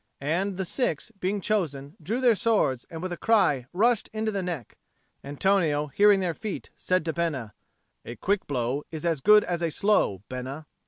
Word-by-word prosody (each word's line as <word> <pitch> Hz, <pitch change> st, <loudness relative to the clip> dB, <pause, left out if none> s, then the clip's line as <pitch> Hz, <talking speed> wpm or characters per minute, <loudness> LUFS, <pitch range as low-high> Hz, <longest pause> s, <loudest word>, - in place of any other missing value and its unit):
And 180 Hz, +7 st, -1 dB
the 190 Hz, -, -2 dB
six, 180 Hz, -, -1 dB
being 195 Hz, +2 st, -1 dB
chosen, 155 Hz, -9 st, -2 dB
drew 225 Hz, +11 st, -2 dB
their 245 Hz, -2 st, +5 dB
swords 205 Hz, -, +1 dB
and 165 Hz, +1 st, -7 dB
with 185 Hz, -, -3 dB
a 175 Hz, -, -4 dB
cry 150 Hz, -, +2 dB
rushed 225 Hz, +5 st, +2 dB
into 220 Hz, 0 st, -2 dB
the 200 Hz, -2 st, -2 dB
neck. 170 Hz, -, -5 dB, 0.5 s
Antonio, 150 Hz, 0 st, +1 dB
hearing 205 Hz, -1 st, +5 dB
their 175 Hz, -2 st, 0 dB
feet, 210 Hz, +4 st, -6 dB
said 185 Hz, -3 st, 0 dB
to 160 Hz, -, -1 dB
Bena, 150 Hz, -, -2 dB, 0.5 s
"A 120 Hz, -, -7 dB
quick 200 Hz, +7 st, -1 dB
blow 130 Hz, +1 st, -1 dB
is 160 Hz, 0 st, -6 dB
as 165 Hz, -5 st, 0 dB
good 210 Hz, +4 st, +7 dB
as 175 Hz, -1 st, -3 dB
a 170 Hz, -, +1 dB
slow, 160 Hz, -, +1 dB
Bena." 130 Hz, +4 st, -6 dB
175 Hz, 180 wpm, -26 LUFS, 145-205 Hz, 0.5 s, good